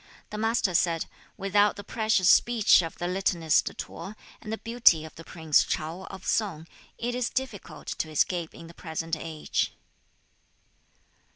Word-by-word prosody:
The 210 - -5
Master 225 -4 +1
said, 165 -1 +2 0.3
'Without 205 +1 +2
the 200 - -9
specious 215 -5 +1
speech 230 -5 +6
of 165 -1 -6
the 175 - -3
litanist 175 -4 +2
T'o 190 +6 -7 0.3
and 215 - -7
the 220 - -2
beauty 225 -10 +4
of 160 - -11
the 165 - -11
prince 160 -3 +2
Chao 165 +5 -4
of 190 -1 -10
Sung, 180 -8 -1 0.3
it 240 +1 -2
is 250 -1 -1
difficult 260 -7 -5
to 160 - -2
escape 165 +2 0
in - - -11
the 165 - -12
present 165 -1 -4
age.' 155 -1 -3
185 Hz, 155 wpm, -27 LUFS, 165-215 Hz, 0.3 s, speech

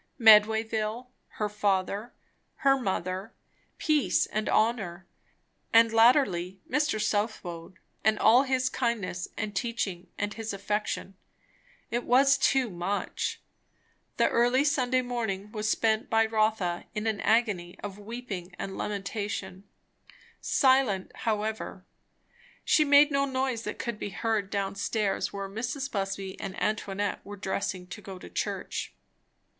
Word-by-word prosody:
Medwayville, 220 +1 +4 0.2
her 210 - -1
father, 205 +2 -1 0.5
her 275 0 +7
mother, 190 -3 -3 0.4
peace 305 -3 +2
and 215 0 -2
honour, 200 -5 +1 0.7
and 230 0 +6
latterly 225 -7 +4
Mr. 295 -5 +1
Southwode, 200 -5 -2 0.3
and 220 0 +3
all 235 +5 +6
his 260 -1 +1
kindness 230 -9 -2
and 215 -2 -3
teaching 195 -4 -2
and 205 +1 -2
his 220 -2 -5
affection. 205 0 -2 0.8
It 240 +1 -1
was 275 +2 +4
too 265 -4 +2
much. 180 +3 -3 0.8
The - - +4
early 245 +3 +3
Sunday 255 -3 +2
morning 215 -5 -3
was 215 0 -2
spent 220 -1 +1
by 225 0 +4
Rotha 215 -5 0
in 210 +1 -2
an 220 -2 -1
agony 210 -6 +1
of 205 -1 -6
weeping 205 -5 -7
and 195 -1 -5
lamentation; 200 -1 -4 0.8
silent, 260 -8 +3
however; 220 -1 -3 0.8
she 310 - +5
made 290 +1 +6
no 275 0 +2
noise 260 -3 -1
that - - -4
could 235 -4 -4
be - - -3
heard 210 0 -1
down 200 -1 -1
stairs 200 0 -1
where 200 -1 -4
Mrs. 245 +7 -4
Busby 195 -1 -3
and 195 -1 -5
Antoinette 205 -1 -1
were 205 0 -9
dressing 190 -1 -3
to 180 +3 -9
go 195 -2 -8
to - - -12
church. - - -3
215 Hz, 130 wpm, -28 LUFS, 195-240 Hz, 0.8 s, her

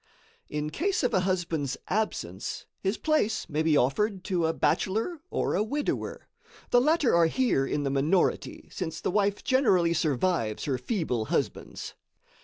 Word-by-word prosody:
In 150 0 -3
case 375 - 0
of 250 - +1
a 190 - +4
husband's 170 -7 -1
absence, 140 - -2
his 195 +2 -1
place 305 -9 +1
may 155 -2 -1
be 160 -2 +3
offered 190 - +1
to 180 -5 0
a - - +2
bachelor 210 - 0
or - - -1
a 190 - +2
widower. 285 +7 -2 0.4
The 245 - +6
latter 300 -1 +3
are 170 -1 +5
here 165 - +1
in 145 - -1
the 135 - 0
minority, 150 +7 0
since 160 -4 -4
the - - -1
wife 200 0 +1
generally 190 -11 +3
survives 150 -7 0
her 135 -4 -1
feeble 130 - -1
husbands. - - -3
180 Hz, 155 wpm, -28 LUFS, 150-220 Hz, 0.4 s, The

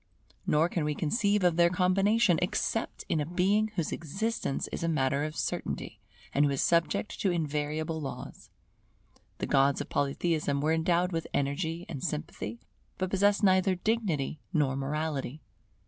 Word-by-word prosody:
Nor 155 +2 +4
can 170 -2 -2
we 150 0 -1
conceive 200 - +1
of 175 -2 +3
their 170 0 +6
combination, 190 +1 +3
except 215 +4 -1
in 160 - +1
a 150 - 0
Being 195 +5 +2
whose 170 -5 -1
existence 195 - -2
is - - -5
a 165 - 0
matter 140 -3 +1
of 155 0 -5
certainty, - - -3 0.3
and 140 - +4
who 145 - +3
is 140 -1 0
subject 170 +4 +1
to 195 - +2
invariable 155 -1 -2
laws. 140 - -7 0.9
The - - -2
gods 140 0 +3
of - - -5
Polytheism 145 0 0
were 155 +3 +2
endowed 175 +2 +2
with 165 -2 -2
energy 160 +5 -1
and 140 -5 -6
sympathy, 160 +8 -4 0.4
but 185 -1 -2
possessed 205 +2 +3
neither 185 -1 +4
dignity 180 -8 -1
nor 145 -6 +1
morality. 150 0 -3
165 Hz, 155 wpm, -29 LUFS, 150-185 Hz, 0.9 s, their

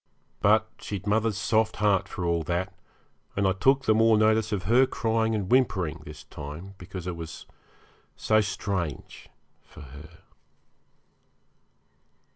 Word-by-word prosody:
But 110 +2 +3
she'd 100 -2 -6
mother's 110 0 +1
soft 110 0 +1
heart 100 -3 +2
for 90 - -5
all 85 -1 +1
that, 90 +3 -2 0.6
and 100 -1 +1
I - - +3
took 135 +8 +2
the 110 - +4
more 115 0 +4
notice 110 0 +2
of 100 -4 -2
her 120 +8 +4
crying 115 -1 0
and 100 -3 -2
whimpering 95 - +1
this 75 0 -10
time 75 +7 -9
because 90 0 -8
it 90 -1 -3
was 80 -1 -8 0.7
so 110 0 +2
strange 95 -7 -4 0.3
for - - -15
her. 70 0 -13
100 Hz, 135 wpm, -26 LUFS, 85-110 Hz, 0.7 s, the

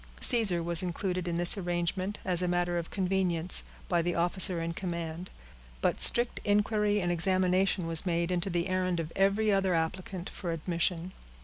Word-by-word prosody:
Caesar 200 -8 +2
was 170 0 +2
included 180 0 -3
in 170 -1 -2
this 175 +4 +2
arrangement, 180 +2 -2
as 180 -2 +1
a 180 - 0
matter 175 0 0
of 165 - -7
convenience, 185 -3 +2 0.2
by 175 -2 +1
the 175 +1 -2
officer 175 +1 +3
in 165 0 -3
command; 170 -1 -5 0.5
but - - 0
strict 240 0 +4
inquiry 210 0 +1
and 175 -2 -1
examination 185 +1 +1
was 165 -1 0
made 170 -1 -1
into 180 +1 -1
the 175 0 -1
errand 185 -2 -1
of 165 0 -5
every 200 +2 +2
other 195 -2 +1
applicant 175 +2 -3
for 175 -3 -5
admission. 170 +2 -2
180 Hz, 170 wpm, -29 LUFS, 170-190 Hz, 0.5 s, strict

